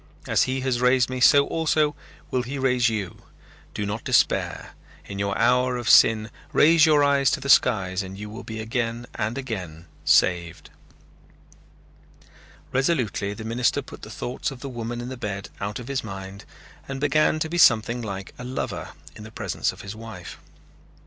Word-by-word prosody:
As - - +2
he 130 0 -1
has 130 -2 -1
raised 125 0 +3
me 130 - -3
so 140 +2 +6
also 155 -2 +1 0.4
will 130 - +1
he 130 +3 -5
raise 125 -3 +2
you. 105 -5 -4 0.5
Do 105 - -2
not 105 +2 -4
despair. - - +1 0.3
In 100 -1 -7
your 100 0 -1
hour 125 +2 +2
of 120 -1 -5
sin 110 0 +5 0.2
raise 160 +1 +6
your 150 -2 +5
eyes 140 -1 +3
to 145 - -1
the 140 0 -6
skies 95 -7 +3
and 95 0 -8
you 105 +1 -7
will 110 +4 -9
be 110 -1 -7
again 115 +1 -3
and 110 +2 -3
again 90 -11 -6 0.2
saved." 85 -2 +2 2.0
Resolutely 125 -8 0
the 110 - -8
minister 115 +2 0
put - - -12
the - - -9
thoughts 125 - -4
of 130 -3 -10
the 140 - -5
woman 120 -1 -5
in 120 - -6
the 130 - -7
bed 100 -4 -5
out 100 +1 -4
of 125 - -8
his 140 -1 -2
mind 95 -1 -8 0.4
and 135 -1 -5
began 150 +2 +2
to 155 - -1
be 175 +2 -2
something 120 -3 +4
like 100 -3 -6
a - - -6
lover 125 +1 -5 0.2
in 110 - -10
the 110 - -10
presence - - -2
of - - -12
his 100 +1 -7
wife. 110 -6 -9
120 Hz, 180 wpm, -24 LUFS, 105-130 Hz, 2.0 s, so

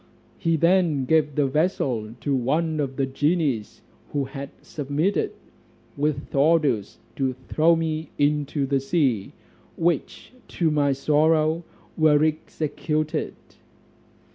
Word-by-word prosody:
He 165 -1 +1
then 170 -4 +2
gave 150 0 +2
the 145 - +2
vessel 130 - -1
to 140 +3 -1
one 155 +5 0
of 135 -2 -2
the 135 - 0
genies 140 -4 -1 0.3
who 145 -1 +1
had 135 +1 -7
submitted, 150 +7 -1 0.6
with 145 0 -2
orders 140 -7 +2 0.2
to 130 -2 0
throw 165 +2 +4
me 160 -1 -2
into 145 -1 +1
the 135 0 +1
sea, 135 - 0 0.4
which 170 - -1
to 165 -3 0
my 145 -2 +2
sorrow 155 +3 +2 0.3
were 155 -2 +4
executed. 155 0 -2
150 Hz, 115 wpm, -24 LUFS, 135-160 Hz, 0.6 s, throw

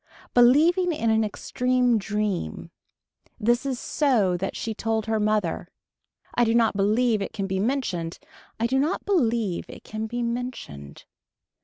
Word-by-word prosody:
Believing 320 +9 +5
in 230 -8 0
an 220 0 +3
extreme 250 +2 +1
dream. 205 - -3 0.7
This 240 +5 +1
is 260 -3 -2
so 230 - +1
that 190 +2 -3
she 225 - -3
told 220 0 -1
her 220 -1 0
mother. 210 -5 0 0.7
I 240 - +3
do 225 0 +2
not 230 -3 +3
believe 215 +2 +2
it 195 - -4
can 195 - -3
be 190 0 -2
mentioned. 195 -8 -1 0.4
I 230 - +1
do 260 +3 +1
not 305 +7 -1
believe 235 - +1
it - - -11
can 220 +1 -5
be 240 +2 -3
mentioned. 235 - -5
225 Hz, 150 wpm, -25 LUFS, 205-250 Hz, 0.7 s, Believing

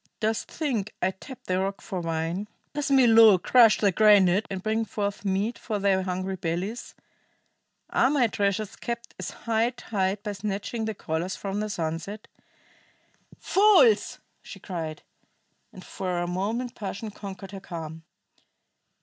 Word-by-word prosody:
Dost 220 0 -1
think 235 -10 -2
I 185 - +1
tap 250 +7 -12
the 185 0 -1
rock 195 +1 -2
for 185 -2 -5
wine? 165 +4 -2 0.3
Does 295 -1 -2
Milo 230 -6 +7
crush 225 +4 +5
the 200 -2 +3
granite 205 0 +5
and 190 -1 -5
bring 220 +1 0
forth 205 -2 -3
meat 200 +4 -1
for 215 -3 -3
thy 195 -1 +2
hungry 185 +1 -3
bellies? 180 +7 -4 1.0
Are - - +3
my 280 -4 +3
treasures 205 -1 -1
kept 235 0 -6
at - - -4
high 230 0 0
tide 205 -5 -2
by 210 - -3
snatching 205 +3 -3
the 220 -1 -3
colors 170 +1 -3
from 200 0 -4
the 215 0 -2
sunset? 170 +3 -4 1.1
Fools!" 425 +3 +4 0.2
she - - -11
cried, 160 -5 -5 0.7
and 185 - -12
for 180 -2 -3
a 175 - 0
moment 215 +8 -2
passion 210 +1 -6
conquered 195 -2 -9
her 195 - -7
calm. 165 -4 -7
200 Hz, 145 wpm, -26 LUFS, 185-225 Hz, 1.1 s, Milo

